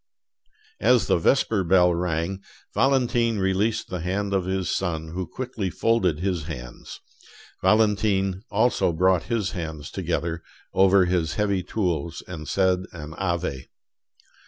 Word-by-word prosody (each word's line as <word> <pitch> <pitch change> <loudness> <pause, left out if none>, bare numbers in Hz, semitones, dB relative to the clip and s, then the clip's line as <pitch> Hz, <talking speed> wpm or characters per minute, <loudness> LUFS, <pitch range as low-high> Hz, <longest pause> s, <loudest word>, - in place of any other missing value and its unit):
As 125 -2 +4
the - - +3
vesper 110 0 +2
bell 90 0 +4
rang, 85 +2 -2 0.3
Valentine 120 -4 +2
released 100 +4 0
the 90 - -3
hand 100 +4 -2
of 95 -2 +1
his 95 0 -1
son, 80 -4 -2
who 90 +2 -4
quickly 115 -3 -4
folded 95 -5 +1
his 90 -5 -1
hands; 60 -7 -8 0.6
Valentine 100 -2 +2
also 110 -4 +2
brought 90 +1 +2
his 110 -5 0
hands 80 -5 -6
together 85 +2 -2 0.3
over 95 0 +5
his 85 -2 0
heavy 100 -3 +1
tools 85 -4 -2
and 80 -4 -7
said 95 -1 +2
an 80 -2 -8
Ave. 85 -8 -2
95 Hz, 130 wpm, -24 LUFS, 85-100 Hz, 0.6 s, over